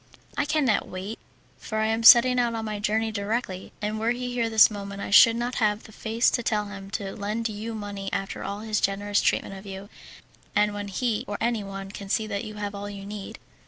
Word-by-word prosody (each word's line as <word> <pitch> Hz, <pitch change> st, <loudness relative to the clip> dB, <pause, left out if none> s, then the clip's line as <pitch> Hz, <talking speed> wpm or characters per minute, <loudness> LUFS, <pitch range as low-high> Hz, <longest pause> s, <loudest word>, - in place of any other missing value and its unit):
"I -, -, +1 dB
cannot 290 Hz, -8 st, +1 dB
wait, 190 Hz, +4 st, -6 dB, 0.4 s
for 220 Hz, -, -5 dB
I 220 Hz, -, +2 dB
am 225 Hz, +1 st, 0 dB
setting 245 Hz, +2 st, +8 dB
out 235 Hz, -1 st, +1 dB
on 225 Hz, -1 st, -3 dB
my 210 Hz, -1 st, -3 dB
journey 220 Hz, +2 st, 0 dB
directly, 200 Hz, -2 st, -3 dB
and 215 Hz, +1 st, -1 dB
were 225 Hz, +1 st, +1 dB
he 245 Hz, +1 st, -2 dB
here 235 Hz, -2 st, 0 dB
this 220 Hz, 0 st, +7 dB
moment 200 Hz, -1 st, -6 dB
I 200 Hz, -, -5 dB
should 230 Hz, +3 st, +8 dB
not 240 Hz, +1 st, -2 dB
have 210 Hz, 0 st, +1 dB
the -, -, -13 dB
face 225 Hz, +2 st, +1 dB
to 240 Hz, -, 0 dB
tell 210 Hz, -2 st, 0 dB
him 195 Hz, -1 st, -9 dB
to 195 Hz, -3 st, -6 dB
lend 215 Hz, +2 st, -2 dB
you 220 Hz, +2 st, -5 dB
money 205 Hz, -2 st, -5 dB
after 195 Hz, 0 st, -3 dB
all 200 Hz, +1 st, -4 dB
his 215 Hz, -1 st, -1 dB
generous 205 Hz, +1 st, +1 dB
treatment -, -, 0 dB
of 195 Hz, +1 st, -10 dB
you, 195 Hz, +1 st, -8 dB, 0.7 s
and 210 Hz, 0 st, +3 dB
when 205 Hz, 0 st, -5 dB
he 220 Hz, +2 st, -1 dB
or 205 Hz, -, -3 dB
anyone 195 Hz, -4 st, -2 dB
can 200 Hz, -1 st, -8 dB
see 220 Hz, -, +1 dB
that 205 Hz, 0 st, -3 dB
you 215 Hz, 0 st, -8 dB
have 205 Hz, -1 st, -4 dB
all 200 Hz, 0 st, -6 dB
you 200 Hz, -1 st, -8 dB
need." 205 Hz, -1 st, -7 dB
210 Hz, 225 wpm, -26 LUFS, 200-225 Hz, 0.7 s, setting